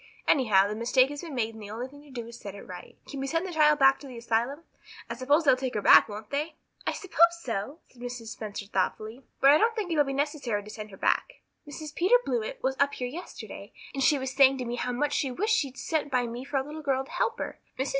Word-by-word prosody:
Anyhow, 210 Hz, -8 st, +4 dB
the 210 Hz, -, -3 dB
mistake 255 Hz, +4 st, +3 dB
has 290 Hz, -, -6 dB
been 325 Hz, -5 st, -7 dB
made 225 Hz, -2 st, -1 dB
and 220 Hz, -, -11 dB
the 205 Hz, -, -8 dB
only 230 Hz, +4 st, -5 dB
thing 285 Hz, +2 st, -15 dB
to 295 Hz, -, -17 dB
do 240 Hz, -3 st, -6 dB
is 235 Hz, -, -10 dB
to -, -, -17 dB
set 200 Hz, -1 st, -7 dB
it 200 Hz, -, -10 dB
right. 180 Hz, -1 st, -10 dB
Can 280 Hz, -, -6 dB
we 270 Hz, -, -2 dB
send 330 Hz, +5 st, 0 dB
the 365 Hz, -, -5 dB
child 300 Hz, -1 st, +5 dB
back 270 Hz, -1 st, +5 dB
to 285 Hz, -, -10 dB
the 250 Hz, -2 st, -9 dB
asylum? 235 Hz, +5 st, -1 dB, 0.5 s
I -, -, -4 dB
suppose 285 Hz, +6 st, +2 dB
they'll 275 Hz, -4 st, +5 dB
take 255 Hz, -1 st, -4 dB
her 210 Hz, -, 0 dB
back, -, -, +8 dB
won't 210 Hz, +1 st, -8 dB
they?" 305 Hz, +3 st, -2 dB, 0.3 s
"I -, -, +3 dB
suppose 340 Hz, -2 st, +3 dB
so," 230 Hz, +6 st, -4 dB
said 245 Hz, -, -18 dB
Mrs. 245 Hz, -2 st, -6 dB
Spencer 210 Hz, -2 st, -6 dB
thoughtfully, 215 Hz, +5 st, -2 dB, 0.2 s
"but 275 Hz, +1 st, +8 dB
I 300 Hz, -, +6 dB
don't 455 Hz, +1 st, +2 dB
think 410 Hz, -6 st, -3 dB
it 325 Hz, -, 0 dB
will 295 Hz, -, +6 dB
be 275 Hz, -, -4 dB
necessary 275 Hz, -7 st, -1 dB
to 210 Hz, -, -10 dB
send 215 Hz, 0 st, -8 dB
her 195 Hz, -, -12 dB
back. -, -, 0 dB, 0.3 s
Mrs. 300 Hz, +1 st, -7 dB
Peter 370 Hz, +10 st, +4 dB
Blewett -, -, -3 dB
was 265 Hz, 0 st, +1 dB
up 285 Hz, 0 st, +2 dB
here 250 Hz, -, -3 dB
yesterday, 330 Hz, +8 st, -9 dB, 0.2 s
and 275 Hz, -, -3 dB
she 290 Hz, +2 st, +4 dB
was 265 Hz, -1 st, -3 dB
saying 270 Hz, -1 st, +6 dB
to 250 Hz, -, -4 dB
me 240 Hz, +1 st, -3 dB
how 250 Hz, -, -2 dB
much 290 Hz, +4 st, -1 dB
she 275 Hz, -, 0 dB
wished 425 Hz, -, +1 dB
she'd 275 Hz, -10 st, -2 dB
sent 310 Hz, -3 st, -1 dB
by 250 Hz, -1 st, +2 dB
me 240 Hz, +2 st, -6 dB
for 280 Hz, -, -2 dB
a 265 Hz, -, +1 dB
little 300 Hz, +3 st, -8 dB
girl 270 Hz, -2 st, 0 dB
to -, -, -15 dB
help 465 Hz, -, 0 dB
her. -, -, -5 dB, 0.2 s
Mrs. 265 Hz, +1 st, -1 dB
270 Hz, 275 wpm, -28 LUFS, 235-300 Hz, 0.5 s, back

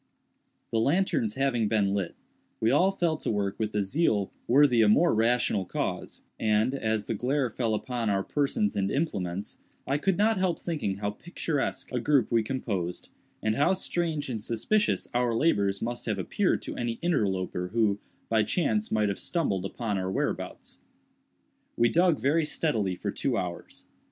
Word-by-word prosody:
The 115 Hz, -, +1 dB
lanterns 135 Hz, -, +1 dB
having 135 Hz, -5 st, +1 dB
been 100 Hz, -2 st, +1 dB
lit, 100 Hz, -4 st, -2 dB, 0.4 s
we 110 Hz, -, +2 dB
all 180 Hz, +8 st, +4 dB
fell 175 Hz, -5 st, 0 dB
to -, -, -4 dB
work 100 Hz, -2 st, -1 dB
with 110 Hz, -1 st, -2 dB
a 105 Hz, -, +2 dB
zeal 105 Hz, -, +1 dB, 0.2 s
worthy 130 Hz, -2 st, +5 dB
a 110 Hz, -, +5 dB
more 165 Hz, +11 st, +4 dB
rational 115 Hz, -2 st, +2 dB
cause; -, -, -4 dB, 0.2 s
and, 110 Hz, +3 st, +2 dB
as 110 Hz, -5 st, -1 dB
the -, -, -2 dB
glare 125 Hz, +3 st, 0 dB
fell 115 Hz, -1 st, 0 dB
upon 120 Hz, 0 st, -2 dB
our 100 Hz, -1 st, +1 dB
persons 135 Hz, -7 st, 0 dB
and 100 Hz, -1 st, 0 dB
implements, 100 Hz, -, -2 dB, 0.3 s
I 140 Hz, +2 st, 0 dB
could 190 Hz, +3 st, +1 dB
not 215 Hz, 0 st, +3 dB
help 185 Hz, -3 st, 0 dB
thinking 150 Hz, -, -2 dB
how 105 Hz, 0 st, -2 dB
picturesque 145 Hz, 0 st, -3 dB
a 125 Hz, -, 0 dB
group 140 Hz, +1 st, +2 dB
we 115 Hz, -1 st, +4 dB
composed, 105 Hz, -8 st, -3 dB, 0.3 s
and 110 Hz, -, +2 dB
how 145 Hz, +10 st, +3 dB
strange 170 Hz, -5 st, -2 dB
and 115 Hz, -5 st, -4 dB
suspicious 205 Hz, -, 0 dB
our 120 Hz, -1 st, +1 dB
labors 100 Hz, -9 st, +1 dB
must 120 Hz, +1 st, -4 dB
have 105 Hz, -3 st, 0 dB
appeared 95 Hz, -, 0 dB
to -, -, -6 dB
any 120 Hz, -1 st, -1 dB
interloper 95 Hz, -, 0 dB
who, 105 Hz, -1 st, +1 dB, 0.3 s
by 110 Hz, -1 st, +3 dB
chance, 185 Hz, -, 0 dB
might 105 Hz, -1 st, +2 dB
have 100 Hz, -, -3 dB
stumbled 120 Hz, -, -1 dB
upon 105 Hz, 0 st, -2 dB
our 95 Hz, 0 st, -2 dB
whereabouts. 95 Hz, -, -3 dB, 1.0 s
We 120 Hz, 0 st, +4 dB
dug 170 Hz, 0 st, +3 dB
very 145 Hz, +7 st, +2 dB
steadily 135 Hz, -, 0 dB
for -, -, -3 dB
two -, -, -1 dB
hours. 90 Hz, -1 st, -5 dB
115 Hz, 170 wpm, -28 LUFS, 105-145 Hz, 1.0 s, worthy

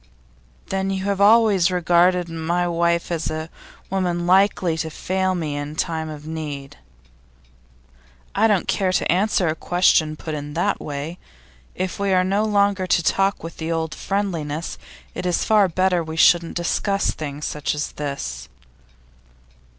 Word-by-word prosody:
'Then 195 Hz, 0 st, -1 dB
you 190 Hz, -1 st, -2 dB
have 200 Hz, -1 st, -1 dB
always 205 Hz, -4 st, +5 dB
regarded 180 Hz, 0 st, +3 dB
my 170 Hz, +2 st, -1 dB
wife 170 Hz, 0 st, 0 dB
as 165 Hz, -2 st, -1 dB
a 155 Hz, +1 st, -5 dB, 0.4 s
woman 175 Hz, -3 st, -1 dB
likely 185 Hz, -2 st, +3 dB
to 160 Hz, 0 st, -3 dB
fail 185 Hz, +3 st, -1 dB
me 155 Hz, -4 st, -3 dB
in 145 Hz, +1 st, -5 dB
time 160 Hz, -1 st, -2 dB
of 150 Hz, -1 st, -9 dB
need?' 150 Hz, -3 st, -6 dB, 1.6 s
'I 220 Hz, +3 st, +3 dB
don't 205 Hz, -5 st, +1 dB
care 190 Hz, -2 st, +1 dB
to 185 Hz, -, +1 dB
answer 190 Hz, 0 st, +2 dB
a 155 Hz, -, +1 dB
question 165 Hz, -3 st, +2 dB
put 155 Hz, +1 st, -6 dB
in 145 Hz, 0 st, -6 dB
that -, -, 0 dB
way. 150 Hz, +4 st, -5 dB, 0.6 s
If 185 Hz, +1 st, -3 dB
we 200 Hz, -1 st, +1 dB
are 185 Hz, 0 st, +4 dB
no 195 Hz, +3 st, +1 dB
longer 200 Hz, -3 st, +2 dB
to 170 Hz, -, +2 dB
talk 195 Hz, +2 st, +1 dB
with 165 Hz, -, -8 dB
the 160 Hz, +1 st, -3 dB
old 160 Hz, -1 st, -2 dB
friendliness, 170 Hz, -6 st, -3 dB, 0.3 s
it's 180 Hz, -1 st, -1 dB
far 210 Hz, -3 st, +4 dB
better 180 Hz, 0 st, +1 dB
we 160 Hz, 0 st, -7 dB
shouldn't 170 Hz, +1 st, +4 dB
discuss 195 Hz, +3 st, 0 dB
things 150 Hz, -1 st, -6 dB
such 150 Hz, 0 st, -2 dB
as 150 Hz, -, -3 dB
this. 140 Hz, -, -5 dB
175 Hz, 150 wpm, -22 LUFS, 160-190 Hz, 1.6 s, always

